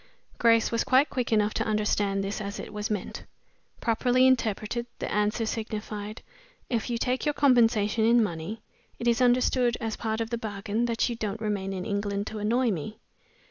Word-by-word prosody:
Grace 230 -1 +4
was 230 - +1
quite 265 +3 +3
quick 250 -3 -2
enough 210 -1 +2
to - - 0
understand 210 -2 0
this 200 +2 -3
as 200 0 -5
it - - -8
was 210 0 -3
meant. 210 -3 -3 0.6
Properly 245 +2 +3
interpreted, 235 -2 +1
the - - -4
answer 210 +2 +1
signified 215 -1 -5 0.5
"If 235 0 -1
you 235 - -1
take 255 +2 -1
your 295 -1 0
compensation 230 -5 +3
in 230 +1 +5
money, 200 +4 -5 0.3
it 235 - -3
is 235 +1 +3
understood, 245 -1 +3
as 225 -1 -3
part 220 -1 -2
of 225 0 -3
the 235 - -1
bargain 210 +1 -2
that 230 -1 +1
you 240 - -3
don't 215 -2 -4
remain 205 -3 -2
in 185 -1 -4
England 200 0 -2
to 215 - -4
annoy 235 +3 +2
me." 205 +4 -5
220 Hz, 180 wpm, -27 LUFS, 210-235 Hz, 0.6 s, in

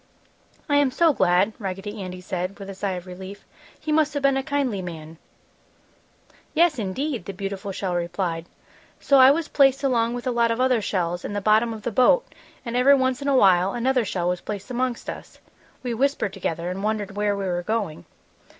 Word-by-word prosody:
"I 290 -2 +3
am 285 -2 +4
so 325 +4 +3
glad!" 190 0 +2
Raggedy 195 +1 -5
Andy 185 -1 -7
said, 185 +1 -4
with 195 -1 -8
a - - -7
sigh 195 0 -3
of 180 -1 -6
relief. 190 +2 -10 0.3
"He 310 - -4
must 305 -1 +2
have 285 - -2
been 275 -1 +4
a 270 - +1
kindly 270 -7 -1
man!" 165 -2 -8 1.4
"Yes, 320 -4 +3
indeed!" 225 - -3
the 195 - -6
beautiful 195 +1 -5
shell 190 -1 -3
replied. 170 -1 -2 0.5
"So 275 -1 +4
I 260 0 +9
was 305 +2 +1
placed 275 -1 +3
along 240 -3 +1
with 245 - -6
a 255 - +1
lot 235 -1 +2
of 230 +1 -1
other 255 -3 +3
shells 175 -3 -2
in - - -5
the 205 - -1
bottom 215 +3 +3
of 220 -2 -7
the 240 - -2
boat 255 - +4 0.4
and 235 0 -4
every 265 +3 +6
once 260 0 0
in 280 - -3
a 275 -2 +3
while 190 -3 +4
another 250 +1 +1
shell 180 -4 -2
was 180 -1 -2
placed 205 +3 -6
amongst 250 -1 -2
us. - - -8 0.5
We 245 -2 -2
whispered 265 -5 0
together 175 -2 -3
and 190 +2 -5
wondered 210 -2 -2
where 205 -1 0
we 200 - -3
were 175 -1 -1
going. 200 - -3
210 Hz, 205 wpm, -24 LUFS, 185-260 Hz, 1.4 s, I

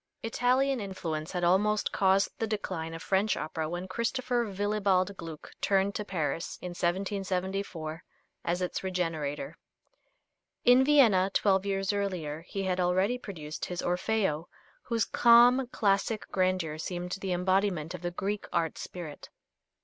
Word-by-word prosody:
Italian 255 +3 +2
influence 170 -5 -4
had 180 -1 -2
almost 205 +4 +2
caused 195 +1 +3
the 225 - 0
decline 180 -6 -3
of 165 - -8
French 200 +2 +1
opera 155 0 -3
when 175 +2 -4
Christopher 240 +3 -1
Willibald 200 -1 +1
Gluck 165 -4 -9
turned 195 0 +2
to 210 - -3
Paris, 170 -4 -3
in 180 - -6
1774, 185 -2 -2 0.4
as 175 +2 -1
its 180 - -3
regenerator. 165 -5 -3 1.1
In 245 +2 +7
Vienna, 235 -10 +5
twelve 195 -1 +2
years 195 0 0
earlier, 180 -7 -2
he 195 - -3
had 185 -1 0
already 185 +7 +2
produced 155 -9 -6
his 180 -1 -4
"Orfeo," 180 -3 0 0.3
whose 230 -4 0
calm, 240 +3 +6
classic 205 -1 0
grandeur 185 -5 0
seemed 180 +1 -4
the 190 - -2
embodiment 180 -2 +1
of 180 - -7
the 175 - -2
Greek 200 +4 -3
art 165 -2 -1
spirit. 165 -5 -8
190 Hz, 135 wpm, -29 LUFS, 175-205 Hz, 1.1 s, In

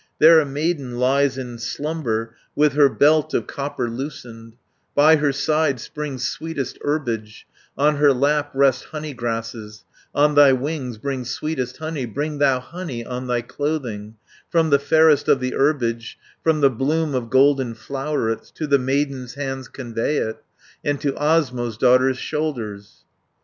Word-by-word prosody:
350 155 - +6
There 165 0 +8
a 155 - +1
maiden 145 -4 -2
lies 135 +1 +2
in 120 -3 -6
slumber, 120 -4 -3 0.2
With 150 -1 +3
her 145 -1 +5
belt 150 +2 +3
of - - 0
copper 140 -3 -4
loosened; 115 -3 -7 0.4
By 155 +2 +6
her 150 -1 +1
side 150 -1 +1
springs 135 -1 -4
sweetest 160 -5 -5
herbage, 115 -8 -3 0.3
On 150 +2 +3
her 145 -1 +5
lap 145 +3 +1
rest 135 -2 +3
honey 155 -1 -6
grasses, 115 -3 -5 0.3
On 150 +1 +4
thy 145 -2 +7
wings 130 -3 -3
bring 130 +3 -3
sweetest 130 0 -3
honey, 155 -5 -4
Bring 145 +5 -4
thou 135 -3 +3
honey 135 -4 -7
on 125 +1 -5
thy 120 -1 0
clothing, 120 -7 -4 0.3
From 165 -2 +2
the 140 - +5
fairest 155 +1 +4
of 135 - +4
the 130 0 -2
herbage, 120 -5 0 0.3
From 160 -2 +2
the 140 -1 +5
bloom 150 +5 0
of 125 -3 -2
golden 130 -2 +3
flowerets, 135 -2 -3
To 155 - -3
the 140 -2 +3
maiden's 135 -1 -2
hands 135 -2 -4
convey 120 +3 -3
it, 110 - -3 0.4
And 145 -1 -1
to 140 -2 0
Osmo's 130 -7 0
daughter's 130 +1 +4
shoulders.' 115 -11 -4
135 Hz, 155 wpm, -21 LUFS, 120-150 Hz, 0.4 s, There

